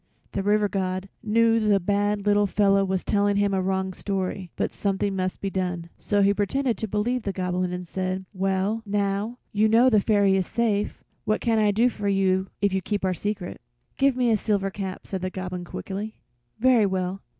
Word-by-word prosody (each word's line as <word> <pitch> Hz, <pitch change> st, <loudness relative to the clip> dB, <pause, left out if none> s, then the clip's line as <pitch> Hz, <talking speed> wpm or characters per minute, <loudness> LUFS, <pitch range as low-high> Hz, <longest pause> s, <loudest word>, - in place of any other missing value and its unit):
The 195 Hz, -, -2 dB
River 205 Hz, +1 st, +2 dB
God 190 Hz, -1 st, -2 dB
knew 230 Hz, +1 st, +3 dB
the 210 Hz, -2 st, +3 dB
bad 205 Hz, +2 st, 0 dB
little 205 Hz, 0 st, +3 dB
fellow 195 Hz, 0 st, +3 dB
was 190 Hz, -1 st, -1 dB
telling 205 Hz, 0 st, +2 dB
him 200 Hz, -1 st, +2 dB
a 190 Hz, -, +1 dB
wrong 190 Hz, 0 st, -1 dB
story, 190 Hz, -1 st, -3 dB
but -, -, -2 dB
something 200 Hz, 0 st, -1 dB
must 185 Hz, -1 st, -2 dB
be 195 Hz, -, -3 dB
done, 180 Hz, -3 st, -3 dB
so 205 Hz, -1 st, +1 dB
he 200 Hz, +1 st, +4 dB
pretended 235 Hz, +5 st, 0 dB
to 220 Hz, -, -2 dB
believe 225 Hz, +5 st, 0 dB
the 200 Hz, -, -2 dB
Goblin, 180 Hz, -1 st, -1 dB
and 180 Hz, 0 st, -5 dB
said: 185 Hz, +1 st, -3 dB
"Well, 195 Hz, +3 st, 0 dB
now 205 Hz, +2 st, -1 dB
you 210 Hz, +1 st, +3 dB
know 240 Hz, +4 st, +5 dB
the 215 Hz, -2 st, +5 dB
Fairy 200 Hz, -2 st, +3 dB
is 190 Hz, -2 st, 0 dB
safe, 215 Hz, -3 st, -1 dB, 0.2 s
what 215 Hz, -, +1 dB
can 230 Hz, -2 st, +1 dB
I 210 Hz, -1 st, +4 dB
do 220 Hz, +4 st, +3 dB
for 210 Hz, -4 st, -3 dB
you 190 Hz, -1 st, +2 dB
if 200 Hz, -1 st, +2 dB
you 190 Hz, -, +1 dB
keep 200 Hz, +1 st, -2 dB
our 185 Hz, -, +1 dB
secret?" 200 Hz, -1 st, -4 dB, 0.3 s
"Give 275 Hz, -1 st, +3 dB
me 250 Hz, -2 st, +2 dB
a 220 Hz, -, +4 dB
silver 200 Hz, -2 st, 0 dB
cap," 190 Hz, -2 st, -6 dB
said 190 Hz, -2 st, -4 dB
the 185 Hz, -, -2 dB
Goblin, 185 Hz, -1 st, -5 dB
quickly. 205 Hz, +4 st, -6 dB, 0.4 s
"Very 240 Hz, -3 st, +4 dB
well. 185 Hz, 0 st, -2 dB
200 Hz, 200 wpm, -25 LUFS, 190-210 Hz, 0.4 s, know